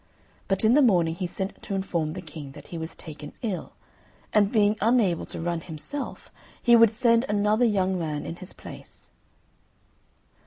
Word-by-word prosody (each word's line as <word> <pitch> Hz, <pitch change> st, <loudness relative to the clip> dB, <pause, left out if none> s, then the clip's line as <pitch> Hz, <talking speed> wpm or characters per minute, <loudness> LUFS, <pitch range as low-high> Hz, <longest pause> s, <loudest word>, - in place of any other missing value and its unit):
But 195 Hz, +1 st, +1 dB
in 220 Hz, -, +5 dB
the 295 Hz, -, +6 dB
morning 175 Hz, -, +4 dB
he 180 Hz, +2 st, -3 dB
sent 190 Hz, +3 st, -4 dB
to 200 Hz, -, -4 dB
inform 170 Hz, -5 st, -1 dB
the 185 Hz, -, -7 dB
King 150 Hz, -4 st, -9 dB
that -, -, -13 dB
he 170 Hz, -, -5 dB
was 160 Hz, 0 st, -5 dB
taken 150 Hz, -1 st, -10 dB
ill, 205 Hz, -6 st, -3 dB, 0.6 s
and 205 Hz, -1 st, +4 dB
being 210 Hz, -2 st, +4 dB
unable 215 Hz, -6 st, +3 dB
to -, -, -6 dB
run 170 Hz, 0 st, -2 dB
himself 180 Hz, -, -5 dB, 0.3 s
he 240 Hz, -1 st, +5 dB
would 230 Hz, -1 st, +7 dB
send 230 Hz, 0 st, +3 dB
another 210 Hz, +3 st, +3 dB
young 190 Hz, -4 st, +1 dB
man 155 Hz, -3 st, -3 dB
in 170 Hz, -, -6 dB
his 185 Hz, -, -9 dB
place. -, -, -11 dB
190 Hz, 170 wpm, -26 LUFS, 165-220 Hz, 0.6 s, would